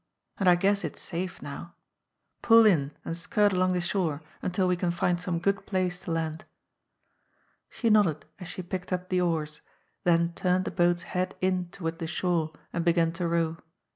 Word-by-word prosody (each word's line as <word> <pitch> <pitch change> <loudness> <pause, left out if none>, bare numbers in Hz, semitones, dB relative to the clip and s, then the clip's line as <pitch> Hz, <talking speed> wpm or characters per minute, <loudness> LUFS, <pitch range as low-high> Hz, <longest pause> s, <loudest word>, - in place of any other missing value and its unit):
And 190 -3 +4
I 175 - +7
guess 200 +3 +1
it's - - -5
safe 180 +1 -4
now. 170 +5 -8 0.7
Pull 230 -1 +7
in 155 -10 +4 0.2
and 165 - -3
skirt 205 +4 +2
along 185 0 +2
the 180 - 0
shore 170 -4 -1 0.2
until 185 +1 0
we 180 - +2
can 180 0 -1
find 175 0 0
some 180 -1 -1
good 200 +3 -1
place 185 -2 -1
to 175 - -6
land." 160 -1 -2 1.3
She 230 -3 0
nodded 175 -9 +3
as 180 - -8
she 185 - -6
picked 180 +1 -5
up 180 0 -2
the 185 -1 +2
oars, 155 -4 -1 0.4
then 170 -1 +3
turned 185 +1 +1
the - - -3
boat's 175 -1 +2
head 185 0 -2
in 185 -1 0
toward 165 -3 -5
the 165 - -3
shore 170 -2 0 0.2
and 170 - -1
began 170 -1 +3
to 175 0 -2
row. 165 -1 0
175 Hz, 185 wpm, -28 LUFS, 170-185 Hz, 1.3 s, I